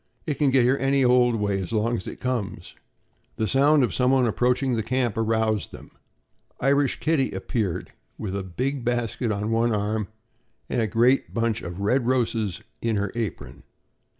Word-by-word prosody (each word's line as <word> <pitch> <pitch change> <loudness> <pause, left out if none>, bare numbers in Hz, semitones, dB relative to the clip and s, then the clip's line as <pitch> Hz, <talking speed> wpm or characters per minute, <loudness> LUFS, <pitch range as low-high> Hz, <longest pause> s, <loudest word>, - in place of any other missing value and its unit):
It 150 -3 -3
can 145 -2 +4
get 130 -1 +4
here 130 +3 +2
any 135 0 +3
old 125 -1 +4
way, 100 -2 0
as 90 - -6
long 115 +2 +1
as 95 - -6
it - - -7
comes." 105 -7 -4 0.6
The 110 - -1
sound 140 +3 +4
of 125 - 0
someone 130 0 +3
approaching 125 +3 +1
the 115 - 0
camp 120 -1 0
aroused 110 -2 0
them. - - -12 0.7
Irish 140 0 +2
Kitty 150 -4 +1
appeared, 105 -8 -3 0.3
with 100 -3 -4
a 100 - -2
big 125 +9 -3
basket 120 -1 -1
on 105 +2 -2
one 115 +1 +2
arm 105 0 -1 0.6
and 120 - -1
a 110 - +1
great 120 +5 +2
bunch 115 -1 0
of 85 +2 -6
red 120 +4 +1
roses 115 -7 0 0.2
in 115 -1 0
her 100 -1 -1
apron. 115 -5 -5
115 Hz, 175 wpm, -25 LUFS, 105-130 Hz, 0.7 s, can